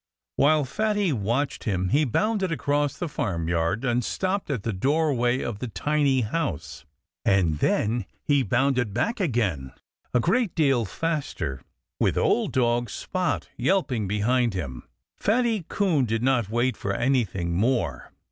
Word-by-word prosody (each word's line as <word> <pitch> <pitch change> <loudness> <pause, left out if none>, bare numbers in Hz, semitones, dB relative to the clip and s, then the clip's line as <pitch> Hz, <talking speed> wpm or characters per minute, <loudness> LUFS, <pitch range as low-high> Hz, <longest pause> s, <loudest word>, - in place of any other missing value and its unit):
While 150 0 +4
Fatty 205 +4 0
watched 120 +6 -1
him 95 -3 0
he 150 +8 +3
bounded 195 - 0
across 145 -2 0
the 175 - -3
farmyard 85 - -1
and 120 -1 +1
stopped 190 - -2
at 125 -8 -2
the 115 - -2
doorway 130 +1 +1
of 110 -4 -4
the 125 - -4
tiny 140 +1 +1
house. 110 - -3 0.4
And 85 -6 +2
then 110 0 +1 0.2
he 145 -2 +3
bounded 125 -1 +1
back 230 - 0
again, 105 - -1 0.4
a 125 - +3
great 205 - +1
deal 135 -7 +3
faster, 120 - -3 0.4
with - - +1
old - - +2
dog 120 -2 +1
Spot 180 - -2
yelping 130 - +1
behind 115 +2 +1
him. 70 -9 -5 0.3
Fatty 225 -4 +1
Coon 175 -10 +2
did 115 0 -1
not 125 -5 +2
wait 120 +3 +1
for 100 -1 -3
anything 105 -9 0
more. 95 - 0
125 Hz, 140 wpm, -25 LUFS, 105-150 Hz, 0.4 s, While